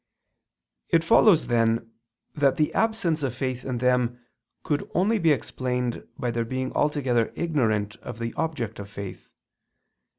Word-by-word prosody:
It 165 -2 +3
follows 210 -3 +5
then, 115 -1 +1 0.4
that 140 -2 +2
the 150 - +1
absence 220 -8 +1
of 130 -4 -2
faith 130 -1 -3
in 130 -2 -3
them 125 -1 +1 0.4
could 145 -1 -1
only 205 +6 +3
be 165 -4 +4
explained 125 -3 -2
by 125 -3 -1
their 115 0 -1
being 130 +2 -3
altogether 130 -6 +1
ignorant 110 -10 0
of - - -8
the 115 0 -4
object 125 -10 -3
of 100 0 -7
faith. 100 -2 -8
125 Hz, 140 wpm, -25 LUFS, 115-155 Hz, 0.4 s, follows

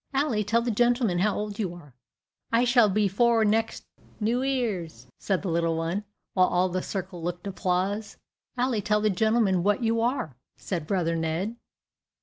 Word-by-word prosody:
"Ally, 270 -6 +1
tell 225 +3 +1
the 240 - 0
gentleman 240 -4 +2
how 205 +2 +1
old 210 0 -4
you 185 -5 -2
are." 145 -6 -14 0.6
"I 230 +2 +3
s'all 240 -3 +5
be 205 +1 +2
four 230 +3 +3
next 225 +2 0 0.4
New 235 +3 +1
'Ear's," 205 - -2
said 190 -2 -1
the - - -3
little 165 0 +1
one, 170 +6 -2 0.3
while 185 -1 +4
all 180 +1 +1
the 185 +1 -2
circle 185 -3 -5
looked 175 +2 -4
applause. 195 +2 -2 0.4
"Ally, 245 -2 +1
tell 210 +1 +1
the 215 0 +2
gentleman 215 -2 +2
what 205 +6 +1
you 225 0 +1
are," 235 - -1 0.2
said 170 -5 -4
brother 170 -3 0
Ned. 165 +7 -2
205 Hz, 170 wpm, -26 LUFS, 180-230 Hz, 0.6 s, s'all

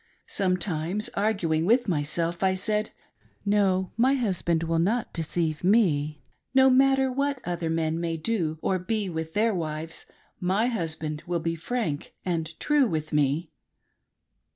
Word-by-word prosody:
Sometimes, 185 0 -1
arguing 195 -7 0
with 235 +7 +3
myself, 165 +1 -1
I 190 -1 +3
said: 210 +3 -1 0.6
No, 195 -3 +2
my 260 +4 +4
husband 180 -9 0
will 165 0 0
not 215 +8 0
deceive 160 -1 -1
me; 155 - +2 0.3
no 265 0 +7
matter 270 0 +4
what 280 +1 0
other 175 -2 -2
men 160 0 0
may 165 -1 -2
do 160 -4 -1
or 185 - +1
be 205 +1 -2
with 160 0 -5
their 220 +1 +3
wives, 160 -2 -4 0.3
my 190 +5 +1
husband 160 -9 -2
will 175 -1 0
be 165 +1 -1
frank 165 -3 -3
and 165 -3 -2
true 295 -3 +3
with 155 -5 -3
me. 150 +3 +1
175 Hz, 140 wpm, -26 LUFS, 160-215 Hz, 0.6 s, no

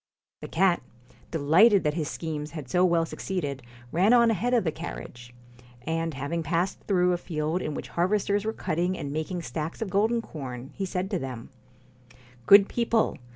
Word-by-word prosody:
The - - -6
cat, 180 +1 +2 0.5
delighted 175 +7 +5
that 150 - +1
his 155 -2 -2
schemes 155 -2 -5
had 150 -5 -6
so 180 +7 +2
well 170 -2 +3
succeeded, 145 -7 -4 0.3
ran 190 +8 +4
on 235 -2 +6
ahead 225 +4 0
of 235 - +3
the 160 - 0
carriage; 120 -6 -8 0.5
and 165 +1 -2
having 145 +5 -2
passed 170 +4 -1
through 180 -2 +3
a - - 0
field 160 +1 -2
in 150 - -3
which - - -6
harvesters 200 +3 +1
were 220 - -1
cutting 180 -2 -1
and 140 - -5
making 165 +3 -3
stacks 155 +4 -4
of 220 -5 -4
golden 220 +5 +2
corn, 130 - -7
he 195 - -3
said 185 +2 -3
to 190 - 0
them: 130 -5 -6 0.5
' 125 -1 -25
Good 200 0 +8
people 230 -2 +1
170 Hz, 180 wpm, -27 LUFS, 150-195 Hz, 0.5 s, Good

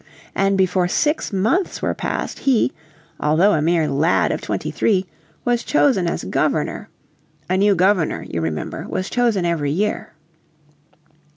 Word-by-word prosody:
And 195 0 +1
before 185 -1 +2
six 300 - 0
months 220 - 0
were - - -1
passed - - -4
he, 245 - +2 0.5
although 165 +7 +3
a 155 - +1
mere 165 0 +2
lad 150 +4 +2
of - - -3
twenty - - -3
three, 195 -3 +1 0.4
was 240 -1 +1
chosen 255 -12 +2
as - - -2
Governor. - - -1 0.6
A 185 - 0
new 200 +1 +3
Governor, 185 -2 +1
you 85 - -3
remember, 80 -2 -4
was 185 - -3
chosen 230 -7 +1
every 165 -4 0
year. 195 +6 -2
185 Hz, 145 wpm, -20 LUFS, 165-210 Hz, 0.6 s, although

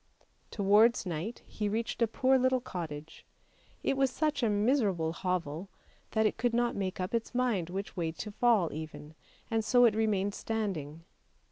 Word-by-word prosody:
Towards 210 +3 +4
night 180 +7 -4
he 210 -1 -3
reached 225 +3 -2
a 230 - +5
poor 260 +4 +3
little 260 0 +3
cottage; 160 -9 -7 0.6
it - - +1
was 270 0 +2
such 305 +1 -1
a 230 - +2
miserable 205 - +1
hovel 180 -1 -3 0.4
that 220 -1 +3
it 215 - +1
could 235 0 0
not 240 0 +1
make 190 -1 -3
up 185 +3 -3
its 230 +1 -2
mind 230 -9 +1
which 195 +3 -5
way 165 -3 -1
to 210 +5 -6
fall 215 -5 +2
even, 155 0 -8 0.4
and 225 -1 +1
so 245 +2 +5
it 225 - +5
remained 205 -2 +1
standing. 165 -10 -4
210 Hz, 165 wpm, -31 LUFS, 175-235 Hz, 0.6 s, a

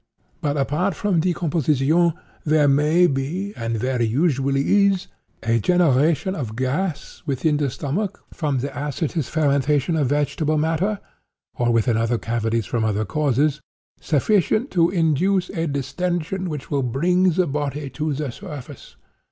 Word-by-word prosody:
But, 145 -2 -1
apart 155 +7 0
from 195 -2 +1
decomposition, 165 -1 +2 0.3
there 155 -1 +3
may 150 +5 +4
be, 170 +7 -2
and 115 0 -3
very 125 +1 0
usually 140 - +2
is, 195 -2 0 0.4
a 115 0 +2
generation 160 - +2
of 120 - -5
gas 145 +6 -2
within 145 +2 +1
the 145 -2 0
stomach, 175 - -3
from 145 -5 -1
the 140 - -2
acetous 145 +2 -2
fermentation 145 0 +1
of 150 -4 +1
vegetable 145 +2 0
matter 165 +7 0 0.5
(or 120 0 0
within 115 0 +2
other 115 +1 +1
cavities 115 -1 -1
from 115 +4 -1
other 110 0 0
causes), 145 +4 +1 0.4
sufficient 210 - +1
to 170 -2 +3
induce 180 +2 +1
a 165 0 -2
distension 175 +6 -2
which 150 -3 -6
will 140 -1 +1
bring 175 +9 +2
the 185 +2 +2
body 145 -1 -3
to 155 0 -2
the 140 -2 -3
surface. 140 +1 -10
150 Hz, 140 wpm, -22 LUFS, 135-170 Hz, 0.5 s, may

